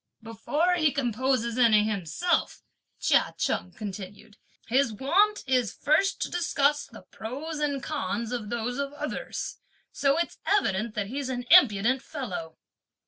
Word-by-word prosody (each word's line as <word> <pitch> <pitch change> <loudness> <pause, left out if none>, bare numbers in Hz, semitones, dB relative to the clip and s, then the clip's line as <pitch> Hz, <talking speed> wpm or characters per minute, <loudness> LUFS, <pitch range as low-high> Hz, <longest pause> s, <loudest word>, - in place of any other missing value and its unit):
"Before 290 - 0
he 310 -4 +3
composes 250 -2 0
any 220 -4 +5
himself," 215 - -1 0.4
Chia - - +2
Cheng 180 - -1
continued, 205 +1 -8 0.3
"his 260 0 +2
wont 390 - +2
is 255 -5 +1
to - - -29
first 325 +7 +2
discuss 295 -4 +1
the 230 - -13
pros 290 +8 -6
and 285 -3 -1
cons 235 -5 -3
of 235 -4 -4
those 240 +3 -3
of 280 0 -3
others; 300 +1 -5 0.3
so 275 +1 +1
it's 340 - -2
evident 220 - +1
that 210 -2 -1
he's 265 +5 -4
an 245 -1 -3
impudent 260 - +6
fellow!" 185 - -6
255 Hz, 140 wpm, -27 LUFS, 220-295 Hz, 0.4 s, impudent